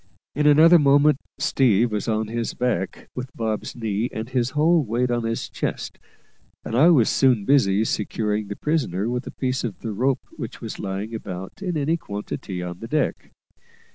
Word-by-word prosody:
In 150 +1 +1
another 160 +4 +7
moment 145 0 +4 0.2
"Steve" 120 -3 +2
was 105 +1 -2
on 110 -1 0
his 115 +1 -3
back, 110 -7 -2
with 125 0 -5
Bob's 110 -2 -3
knee 110 0 -2
and 110 +1 -5
his 125 -2 0
whole 160 +1 +4
weight 120 +1 0
on 120 -1 0
his 115 0 -2
chest; - - -4 0.7
and 115 - -3
I 150 +8 +6
was 135 -10 +5
soon 125 -7 +3
busy 110 -6 +3
securing 105 0 -1
the 100 - -5
prisoner 120 - -1
with 125 +1 -3
a - - -3
piece 130 -1 -2
of 115 -5 -5
the 115 - -4
rope 130 +5 0
which 125 -5 -7
was 115 - -7
lying 100 +3 -4
about 95 - -7
in 180 -4 -2
any 155 +3 +1
quantity 100 - -6
on 90 0 -6
the 115 - -7
deck. 150 +3 -1
120 Hz, 180 wpm, -23 LUFS, 105-140 Hz, 0.7 s, another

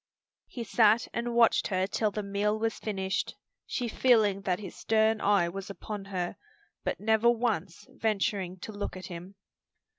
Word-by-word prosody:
He 240 - -6
sat 215 +2 +4
and 235 0 -2
watched 235 -1 +4
her 185 -1 +1
till 210 +2 0
the 210 0 -4
meal 200 +2 0
was 225 0 -1
finished, 190 -3 -2 0.3
she 245 - -2
feeling 215 -5 +3
that 185 -3 0
his 195 -4 -8
stern 220 0 +2
eye 200 -4 +3
was 195 +3 -6
upon 200 0 -6
her, 180 -3 -3 0.5
but - - -2
never 220 +2 +3
once 230 -7 -1
venturing 195 -4 -1
to - - -6
look 205 -3 -5
at 185 - -8
him. 180 +2 -8
205 Hz, 160 wpm, -29 LUFS, 195-220 Hz, 0.5 s, sat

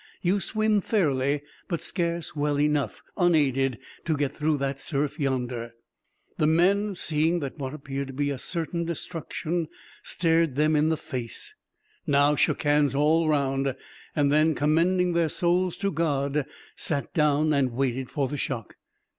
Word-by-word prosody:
You 185 +3 +2
swim 215 0 +1
fairly, 145 - +1 0.2
but 170 -4 -2
scarce 170 -3 -2
well 145 -1 0
enough, 150 -1 0
unaided, 135 - +2 0.3
to 160 -3 0
get 140 -1 -1
through 150 0 +1
that 135 0 -2
surf 145 +3 -2
yonder." 125 -4 -2 0.6
The 150 - +3
men, 195 +5 +3
seeing 165 +1 +1
that 140 +2 -5
what 135 +1 -4
appeared 140 -1 -5
to 135 - -8
be 145 +1 -1
certain 170 +3 -2
destruction 170 0 -3 0.3
stared 165 -4 +1
them 155 +2 +3
in 150 +1 +3
the 160 - +1
face, 120 -5 -6 0.5
now 145 +1 +4
shook - - +1
hands 145 -1 +3
all 155 +3 +3
round; 135 -2 +1 0.4
and 145 -2 +2
then, 155 +1 +3
commending 175 +4 +2
their 170 -2 +2
souls 175 +2 +1
to 200 0 -1
God, 145 -3 0 0.3
sat 140 -3 -2
down 150 0 +3
and 135 -3 +2
waited 130 +1 -1
for 140 -2 -1
the 145 - -4
shock. 120 -5 -4
150 Hz, 150 wpm, -26 LUFS, 140-170 Hz, 0.6 s, now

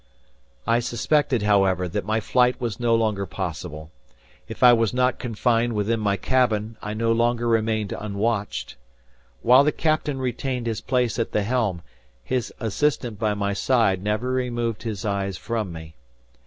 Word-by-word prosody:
I 115 +1 +3
suspected, 120 +1 +1
however, 95 -3 +2
that 85 - -3
my 110 +1 +1
flight 125 +2 +2
was 120 -3 -3
no 120 -1 +3
longer 105 -4 0
possible. 80 -4 -6 0.6
If - - -5
I 125 -1 +9
was 115 0 +1
not 125 0 +1
confined 120 0 0
within 110 +2 0
my 100 -2 0
cabin, 115 -4 +1
I 105 +1 -4
no 115 +1 +1
longer 120 +1 +1
remained 110 -2 +1
unwatched. 105 0 -3 0.7
While 125 +3 +7
the 150 - +2
captain 155 -3 0
retained 125 -1 -3
his 115 -2 -2
place 125 -2 0
at 115 - -2
the 105 - +1
helm, 105 -7 -1 0.4
his 125 -2 -2
assistant 120 -1 -1
by 105 -2 0
my 100 0 -1
side 100 -4 +2
never 105 +5 -1
removed 120 -3 -2
his 110 -4 -4
eyes 100 -2 -2
from 110 -5 -3
me. 80 -1 -9
115 Hz, 155 wpm, -24 LUFS, 105-125 Hz, 0.7 s, I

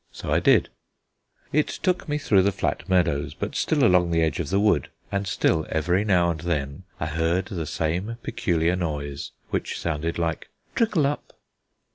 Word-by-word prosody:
So - - -6
I - - +4
did: - - +4 0.8
it 150 +1 +3
took 180 -3 -1
me 150 - +1
through 105 -10 +3
the 100 +2 +2
flat 95 - -3
meadows, 75 -6 +1
but - - -4
still - - +1
along 90 -1 +4
the 85 -1 +2
edge 80 -2 0
of 80 - -2
the 95 - +2
wood, 100 -10 +2 0.2
and 100 0 -1
still 80 -3 +1
every 90 +5 +1
now 90 -4 +3
and 80 - -5
then 75 -4 -3
I - - -1
heard 80 +4 0
the 85 -7 -4
same 90 +11 -2
peculiar 85 -3 0
noise 75 -5 -3 0.2
which - - -2
sounded 80 0 -2
like 85 -2 -2 0.2
Trickle 210 - +2
up. 145 +1 -3
85 Hz, 175 wpm, -25 LUFS, 80-100 Hz, 0.8 s, I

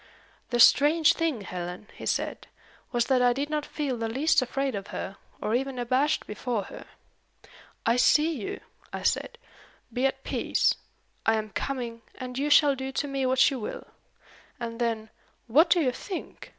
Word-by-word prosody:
"The 240 - 0
strange 300 +6 +6
thing, 320 -9 -1
Helen," 180 +1 -6
he - - -7
said, - - -2 0.4
"was 240 -1 +1
that 255 0 +3
I 245 0 +5
did 285 +4 -3
not 300 -1 -1
feel 280 -5 -2
the 225 -1 -2
least 285 +6 +3
afraid 270 +1 -1
of 200 -1 -5
her, 195 -1 -6 0.2
or 215 - -2
even 265 +1 -1
abashed 260 +5 +1
before 215 0 -3
her. - - -10 1.0
'I 230 +2 +3
see 310 +6 +4
you,' 230 -10 -5 0.3
I - - -5
said. 480 - 0 0.6
'Be 255 +3 +2
at 270 - -5
peace. - - +1 0.5
I 225 - +3
am 215 -1 -3
coming; 240 -3 -4
and 250 -1 -7
you 280 +3 0
shall 290 -1 +6
do 265 0 -5
to 290 - -1
me 275 -2 -1
what 260 +1 +4
you 265 - -3
will.' 210 - -7 0.7
And 230 0 -5
then 225 -2 -1 0.3
what 305 +9 +5
do 350 - +5
you 270 -6 +2
think? 365 +8 -7
255 Hz, 175 wpm, -27 LUFS, 230-285 Hz, 1.0 s, strange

